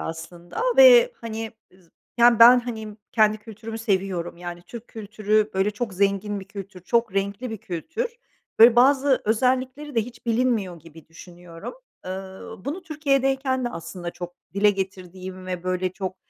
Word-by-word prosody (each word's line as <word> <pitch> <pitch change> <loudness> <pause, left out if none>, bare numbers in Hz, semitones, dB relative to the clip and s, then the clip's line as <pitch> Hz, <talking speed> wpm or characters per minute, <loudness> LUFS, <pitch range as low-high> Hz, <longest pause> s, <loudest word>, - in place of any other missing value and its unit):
aslında 170 - -7 0.2
ve, - - +8
hani, 225 -1 -5 0.3
z 175 -3 -25 0.3
Yani, 235 -1 +6
ben, 245 +2 +9
hani, 220 -3 -7 0.2
kendi 215 -1 +3
kültürümü 225 +1 -8
seviyorum. 190 -6 -1
Yani, 175 0 -8
Türk 235 +6 -11
kültürü, 215 0 -1
böyle, 190 +2 +2
çok 210 -1 -5
zengin 200 +1 0
bir - - -10
kültür, 195 -1 -9
çok 230 +3 0
renkli 200 +5 -2
bir 220 - -5
kültür. 325 - -5 0.4
Böyle, 230 +1 +8
bazı 270 +1 +4
özellikleri 255 +6 0
de 230 - +3
hiç 235 +1 -12
bilinmiyor 225 -7 0
gibi 160 0 -15
düşünüyorum. 170 - -11 0.3
Iıı, 190 0 -8
bunu 320 +7 -4
Türkiye'deyken 270 -5 0
de - - 0
aslında 170 -2 -7
çok 175 0 -8 0.2
dile 205 +1 +4
getirdiğim 185 -1 -6
ve, 180 -2 -4
böyle, 185 0 -1
çok, 190 -1 -5
210 Hz, 150 wpm, -24 LUFS, 185-240 Hz, 0.4 s, ben